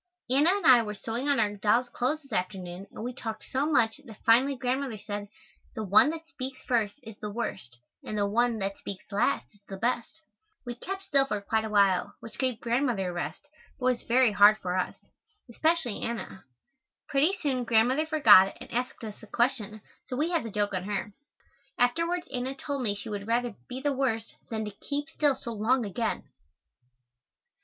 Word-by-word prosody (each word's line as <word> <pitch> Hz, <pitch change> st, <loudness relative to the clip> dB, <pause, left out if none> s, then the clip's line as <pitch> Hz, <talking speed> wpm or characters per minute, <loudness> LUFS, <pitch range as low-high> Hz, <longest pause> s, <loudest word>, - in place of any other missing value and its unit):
Anna 285 Hz, +6 st, +5 dB
and 400 Hz, +2 st, +1 dB
I 250 Hz, -2 st, +8 dB
were 210 Hz, -2 st, -4 dB
sewing 230 Hz, +7 st, -3 dB
on 280 Hz, -, +3 dB
our 205 Hz, -2 st, +1 dB
dolls' 215 Hz, +5 st, +2 dB
clothes 280 Hz, +6 st, -2 dB
this 275 Hz, -4 st, -12 dB
afternoon 185 Hz, 0 st, -3 dB
and -, -, -8 dB
we 250 Hz, +1 st, -3 dB
talked 225 Hz, -3 st, -6 dB
so 270 Hz, +3 st, -1 dB
much 225 Hz, -5 st, +3 dB
that 225 Hz, -7 st, -14 dB
finally 255 Hz, +5 st, +5 dB
Grandmother 255 Hz, -1 st, -2 dB
said, 205 Hz, 0 st, -5 dB, 0.5 s
"the 220 Hz, -, -3 dB
one 210 Hz, +7 st, +6 dB
that 325 Hz, +1 st, -6 dB
speaks 260 Hz, -5 st, -6 dB
first 225 Hz, -5 st, 0 dB
is 225 Hz, -2 st, -10 dB
the 210 Hz, -, -4 dB
worst; 190 Hz, -, -5 dB, 0.3 s
and 215 Hz, -, -4 dB
the 205 Hz, -, +2 dB
one 235 Hz, +3 st, +2 dB
that 195 Hz, -1 st, -3 dB
speaks 195 Hz, -2 st, -7 dB
last 200 Hz, -, +1 dB
is 205 Hz, -, -25 dB
the 195 Hz, -, -7 dB
best." 240 Hz, +7 st, -2 dB, 0.4 s
We 240 Hz, -, -4 dB
kept 385 Hz, +10 st, -6 dB
still 275 Hz, -7 st, +3 dB
for 210 Hz, -5 st, -1 dB
quite 220 Hz, +2 st, 0 dB
a -, -, -4 dB
while, 200 Hz, -3 st, +3 dB
which 225 Hz, -, -11 dB
gave 255 Hz, -4 st, 0 dB
Grandmother 235 Hz, -6 st, 0 dB
a -, -, -5 dB
rest, 175 Hz, -, -5 dB, 0.3 s
but 250 Hz, -, -4 dB
was 255 Hz, -1 st, +2 dB
very 245 Hz, -1 st, +3 dB
hard 205 Hz, +1 st, +7 dB
for 180 Hz, -3 st, -3 dB
us, 185 Hz, -, -1 dB, 0.5 s
especially 295 Hz, -1 st, 0 dB
Anna. 230 Hz, -6 st, -5 dB, 0.6 s
Pretty 310 Hz, +7 st, +2 dB
soon 265 Hz, -6 st, 0 dB
Grandmother 245 Hz, +7 st, +3 dB
forgot 210 Hz, -, +7 dB
and -, -, -11 dB
asked 250 Hz, 0 st, -3 dB
us 215 Hz, -2 st, -7 dB
a -, -, -12 dB
question, 235 Hz, -4 st, -1 dB, 0.3 s
so 250 Hz, -, -4 dB
we 315 Hz, +5 st, 0 dB
had 335 Hz, -3 st, +2 dB
the 230 Hz, -, -5 dB
joke 205 Hz, -1 st, -1 dB
on 185 Hz, -1 st, -2 dB
her. 205 Hz, 0 st, -3 dB, 0.6 s
Afterwards 335 Hz, +8 st, +1 dB
Anna 255 Hz, +1 st, -2 dB
told 280 Hz, 0 st, -4 dB
me 210 Hz, -5 st, 0 dB
she 205 Hz, +3 st, -7 dB
would 205 Hz, -1 st, -5 dB
rather 240 Hz, 0 st, 0 dB, 0.2 s
"be 255 Hz, +1 st, -5 dB
the 285 Hz, +1 st, 0 dB
worst," 245 Hz, -5 st, -1 dB, 0.2 s
than 220 Hz, -1 st, -2 dB
to 210 Hz, -, -5 dB
keep 285 Hz, +9 st, -4 dB
still 295 Hz, -3 st, +2 dB
so 235 Hz, -, -7 dB
long 230 Hz, +3 st, +1 dB
again. 220 Hz, +3 st, -2 dB
235 Hz, 195 wpm, -28 LUFS, 205-265 Hz, 0.6 s, I